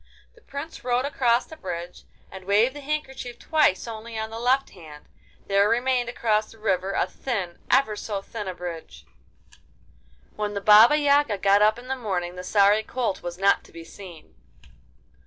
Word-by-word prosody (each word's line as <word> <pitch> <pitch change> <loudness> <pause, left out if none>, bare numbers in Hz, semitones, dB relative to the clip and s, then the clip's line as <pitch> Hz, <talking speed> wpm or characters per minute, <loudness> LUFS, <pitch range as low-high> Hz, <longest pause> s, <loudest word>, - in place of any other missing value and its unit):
The 470 - -22
Prince 285 0 -8
rode 250 +1 0
across 250 -4 +1
the 320 - -12
bridge 175 - -7 0.3
and 190 -1 -10
waved 215 +6 +3
the - - -7
handkerchief 265 -4 -5
twice 305 -11 +1
only 225 0 -7
on 220 0 -4
the 225 - -6
left 260 +3 +1
hand; 155 -4 -13 0.4
there 200 +1 +3
remained 245 0 +1
across 215 -3 0
the 225 - -16
river 195 -3 -1
a - - +1
thin, 195 -10 -5
ever 255 -5 +3
so 205 -1 -4
thin 210 -2 -7
a 185 - -4
bridge! 175 -2 -8 1.3
When 210 -1 -3
the - - -1
Baba 215 +7 +7
Yaga 285 -6 +2
got 200 +1 +3
up 215 +1 +4
in 245 +1 -11
the 265 - -2
morning 185 -7 -3
the 180 - -7
sorry 205 +2 +4
colt 230 -2 -3
was 175 0 -6
not 195 +1 +3
to - - -19
be 165 - -10
seen! 175 -2 -13
215 Hz, 175 wpm, -24 LUFS, 190-250 Hz, 1.3 s, Baba